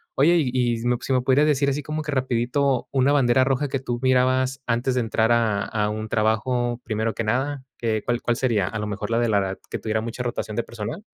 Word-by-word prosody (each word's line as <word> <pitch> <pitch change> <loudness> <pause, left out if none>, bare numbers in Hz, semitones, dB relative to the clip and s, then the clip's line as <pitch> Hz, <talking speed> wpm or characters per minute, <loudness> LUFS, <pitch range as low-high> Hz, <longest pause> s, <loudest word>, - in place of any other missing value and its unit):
Oye, 160 +6 +4
y, 125 -2 0
si 120 - -3
me 125 -1 +2
si 135 - -2
me 125 - +3
podrías 135 +4 +3
decir, 140 -2 +2
así 140 +1 -2
como 155 +1 -3
que 150 -1 -4
rapidito, 130 0 0
una 135 +1 +3
bandera 130 -2 +4
roja, 135 +2 0
que 135 - -1
tú 120 -2 -4
mirabas, 130 +1 +2
antes 125 +2 0
de 125 - +2
entrar 115 0 +1
a 110 -4 +2
a 105 -1 -1
un 110 0 -5
trabajo, 120 +3 0
primero 110 0 -1
que 115 - -3
nada, 135 +5 -1
¿qué 110 -2 -1
cuál 120 0 -1
cuál 120 0 0
sería? 110 -8 +1
¿A 110 - -4
lo 105 - -3
mejor, 105 +2 -4
la 115 - +2
de 120 -1 +1
la 105 - +3
edad, 95 -1 -2
que - - -3
tuviera 110 0 -2
mucha 115 +2 -5
rotación 110 -3 -4
de 120 - +1
personal? 115 - -6
120 Hz, 240 wpm, -23 LUFS, 110-130 Hz, -, Oye